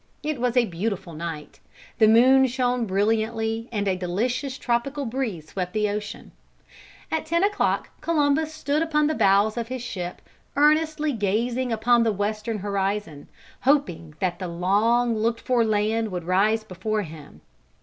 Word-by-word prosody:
It 300 -4 -3
was 250 0 0
a 245 - +5
beautiful 190 -1 -4
night, 155 -1 -7 0.4
the 220 - +6
moon 260 +4 +6
shone 245 -2 0
brilliantly 220 +3 0
and 205 -3 -1
a 190 - +2
delicious 240 +9 -2
tropical 270 +4 -1
breeze 225 - -4
swept 180 -2 -4
the 210 -1 +1
ocean. 210 0 -5 0.8
At 320 0 -2
ten 335 +3 +1
o'clock 410 0 0
Columbus 310 -1 +1
stood 305 -1 -1
upon 300 -2 +2
the 310 - +1
bows 200 -2 +3
of 230 -1 -2
his 255 0 -5
ship 180 -7 -6 0.3
earnestly 305 +1 +2
gazing 235 +4 -1
upon 235 +2 +3
the 230 -1 +2
western 215 +2 -2
horizon, 200 -5 -3 0.3
hoping 175 - +1
that 180 -2 -1
the 185 - -4
long 215 +7 +2
looked 230 +2 0
for 245 -2 +2
land 220 +1 0
would 180 -3 -4
rise 205 +5 +2
before 215 +2 -3
him. 150 - -12
225 Hz, 150 wpm, -24 LUFS, 195-255 Hz, 0.8 s, the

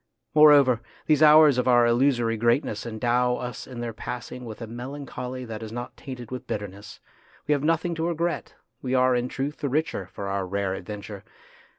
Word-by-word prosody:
Moreover, 145 -6 +6 0.2
these 155 -1 +3
hours 150 -3 +7
of 125 - 0
our 120 -1 +5
illusory 120 -1 +2
great 120 +5 +2
ness 105 +2 -5
endow 120 +2 +1
us 125 0 -6
in 125 -2 -7
their 120 -1 -4
passing 125 +2 -7
with 110 -2 -8
a 115 - -5
melan 125 +5 -7
choly 125 0 -6
that 110 -2 -7
is 110 -1 -7
not 120 +1 -6
tainted 125 -3 -9
with 130 -1 -6
bitterness. 100 -1 -6 0.5
We - - -1
have 145 -1 +2
nothing 165 +2 +1
to 165 0 -2
regret; 170 0 -2 0.3
we 130 0 -1
are 130 0 +4
in 120 0 0
truth 140 +3 -4
the 140 - -2
richer 145 - -1
for 100 +1 -7
our 95 -1 -2
rare 100 0 -1
adventure. 100 0 -7
125 Hz, 195 wpm, -25 LUFS, 110-140 Hz, 0.5 s, hours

